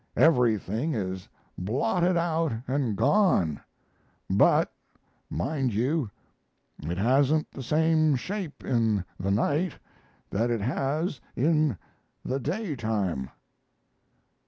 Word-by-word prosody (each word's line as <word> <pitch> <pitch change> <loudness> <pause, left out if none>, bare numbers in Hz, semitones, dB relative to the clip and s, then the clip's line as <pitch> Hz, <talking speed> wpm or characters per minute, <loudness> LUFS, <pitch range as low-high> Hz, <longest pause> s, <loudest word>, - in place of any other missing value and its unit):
Everything 125 - +3
is 95 -3 -4 0.3
blotted 125 - +1
out 165 -2 +1 0.2
and 130 -5 0
gone. 170 - +3 0.7
But - - +4 0.6
mind 135 -6 -1
you, 130 +2 0 0.7
it 85 +4 -3
hasn't 135 +8 +2
the 135 - -8
same 155 +2 +3
shape 180 +3 -5
in 110 -6 +1
the 95 +2 -1
night 145 - +1 0.6
that 115 +4 +1
it 115 -3 0
has 140 - -1
in 150 - +2 0.5
the 130 +2 -1
daytime." 115 - -2
130 Hz, 95 wpm, -27 LUFS, 110-155 Hz, 0.7 s, But